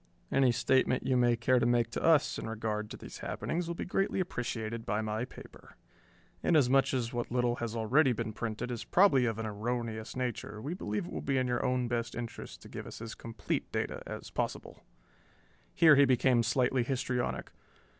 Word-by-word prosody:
Any 135 -2 +4
statement 130 +1 +2
you 130 -1 +2
may 120 -1 +4
care 125 +2 +3
to 120 - +1
make 120 -1 +2
to - - -3
us 160 -3 +3
in - - -5
regard 110 -1 -3
to - - -7
these - - -10
happenings 170 +1 -3
will 170 - -3
be - - -4
greatly 195 +1 0
appreciated 115 -9 -3
by 105 0 -1
my 110 +2 -2
paper. - - -14 0.7
Inasmuch 135 -5 +4
as 120 -2 -2
what 120 -1 -2
little 120 -1 +1
has 115 -1 -4
already 125 +5 +3
been 115 -2 -3
printed 115 +2 -4
is 120 - -4
probably 155 -10 +4
of 115 -2 -2
an 115 - -3
erroneous 110 +1 -3
nature, 120 -4 -3
we 145 +9 -4
believe 105 - -3
it - - -9
will - - -4
be 135 -1 0
in 130 - +2
your 125 -1 0
own 125 -1 +1
best 120 0 -2
interest 120 -1 -7
to - - -11
give - - -7
us - - -9
as 115 0 -6
complete 115 -1 -4
data - - -2
as - - -7
possible." - - -4 0.9
Here 155 - +7
he 140 0 +6
became 130 -1 +3
slightly 125 +2 +2
histrionic. 125 0 -2
120 Hz, 195 wpm, -31 LUFS, 115-130 Hz, 0.9 s, Here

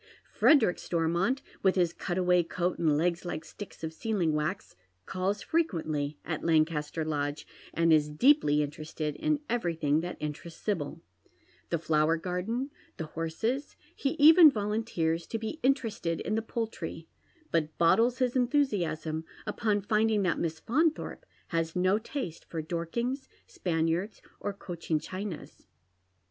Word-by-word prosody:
Frederick 230 - +5
Stormont, 175 +10 0 0.2
with 190 -1 +3
his 175 -3 +2
cutaway 180 0 +2
coat 175 +1 -2
and 155 -3 +3
legs 170 +2 +1
like 170 -3 -4
sticks 205 -5 -10
of 160 0 -3
sealing 180 -4 0
wax, 150 - -2 0.3
calls 195 +2 -2
fre 330 - +2
quently 155 - -1
at 160 -2 -3
Lancaster 155 -1 +1
Lodge, 145 -1 -2 0.3
and 165 -1 +3
is 150 -1 +4
deeply 150 - +4
interested 150 0 -4
in 305 - 0
everything 165 -10 +1
that 175 +2 -4
interests 150 +2 -6
Sibyl, 165 -5 -3 0.3
— 95 +2 -34
the 170 - +1
flower 160 0 +2
garden, 190 - -2 0.3
the 160 - -3
horses; 220 - -2 0.2
he 275 - -1
even 320 +2 +9
volunteers 205 - -1
to 225 - -2
be 225 +8 -5
interested 225 - 0
in - - -2
the 220 - +1
poultry, 225 0 -5 0.4
but 155 -2 0
bottles 230 +9 +4
Ins 255 -1 +1
enthusiasm 185 - +1 0.2
upon 210 -3 0
finding 215 0 +2
that 180 - +1
Miss 160 -1 -2
Faunthorpe 310 - 0 0.2
has 165 -1 -1
no 185 +3 +3
taste 225 - -5
for 160 -2 -5
Dorkings, 235 - -3 0.2
Spaniards, 165 +4 -1 0.2
or 205 - -2
Cochin 170 -5 -3
Chinas. 185 0 -7
175 Hz, 140 wpm, -29 LUFS, 160-225 Hz, 0.4 s, even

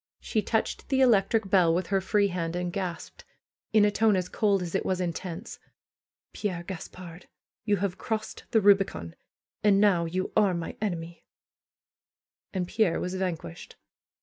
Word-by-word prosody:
She 215 - -1
touched 220 +2 -2
the 265 -2 +2
electric 220 -3 +3
bell 180 -4 +5
with 180 0 0
her 195 +1 0
free 200 +1 +2
hand 170 -2 -3
and 175 0 -3
gasped, 180 -4 -5 0.5
in 215 -1 +5
a 205 - +3
tone 215 0 +3
as 180 -1 -1
cold 200 -4 +1
as 170 - -6
it 195 - 0
was 185 -1 -1
intense: 180 +3 -5 0.7
Pierre 180 -5 -3
Gaspard, 180 -1 -9 0.4
you 205 -2 +2
have 190 -1 -2
crossed 220 -1 -4
the 220 - +3
Kubicon! 195 - +3 0.5
And 200 -2 +5
now 195 -5 +4
you 185 +3 -2
are 205 -4 +3
my 170 -1 -5
enemy 170 -5 -4 1.3
And 185 -2 -2
Pierre 210 -4 +1
was 180 - -3
vanquished. 175 - -4
190 Hz, 155 wpm, -27 LUFS, 175-205 Hz, 1.3 s, bell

